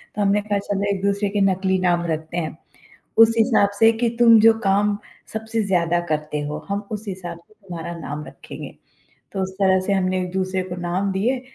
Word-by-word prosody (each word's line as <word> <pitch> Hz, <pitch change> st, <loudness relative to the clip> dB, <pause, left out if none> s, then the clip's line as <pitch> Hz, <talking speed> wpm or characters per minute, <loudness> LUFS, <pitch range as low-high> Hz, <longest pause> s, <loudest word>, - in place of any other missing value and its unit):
तो 210 Hz, -, -1 dB
हमने 205 Hz, +1 st, +3 dB
कहा 205 Hz, -1 st, -1 dB
चलो 200 Hz, 0 st, -1 dB
एक-दूसरे 200 Hz, +1 st, 0 dB
के 205 Hz, 0 st, -1 dB
नकली 190 Hz, 0 st, 0 dB
नाम 175 Hz, -1 st, +1 dB
रखते 160 Hz, +2 st, -4 dB
हैं। 160 Hz, -1 st, -3 dB, 0.6 s
उस 225 Hz, 0 st, +7 dB
हिसाब 220 Hz, -3 st, +4 dB
से 225 Hz, 0 st, +7 dB
कि, 230 Hz, +1 st, 0 dB
"तुम 230 Hz, -2 st, +7 dB
जो 225 Hz, +1 st, +7 dB
काम 200 Hz, +1 st, +2 dB, 0.4 s
सबसे 220 Hz, 0 st, -2 dB
ज़्यादा 175 Hz, -2 st, +1 dB
करते 150 Hz, -1 st, -2 dB
हो, 150 Hz, +1 st, -4 dB
हम 200 Hz, +1 st, -1 dB
उस 210 Hz, +1 st, -4 dB
हिसाब 175 Hz, -3 st, -6 dB
से 215 Hz, +5 st, -25 dB
तुम्हारा 170 Hz, -4 st, -7 dB
नाम 150 Hz, -1 st, -6 dB
रखेंगे, -, -, -10 dB, 0.6 s
तो 195 Hz, -, -3 dB
उस 190 Hz, 0 st, -3 dB
तरह 190 Hz, -1 st, +4 dB
से 200 Hz, -, +1 dB
हमने 185 Hz, -1 st, +1 dB
एक-दूसरे 185 Hz, +1 st, -2 dB
को 180 Hz, -, -4 dB
नाम 190 Hz, +3 st, 0 dB
दिए 245 Hz, +7 st, 0 dB
190 Hz, 190 wpm, -22 LUFS, 175-210 Hz, 0.6 s, उस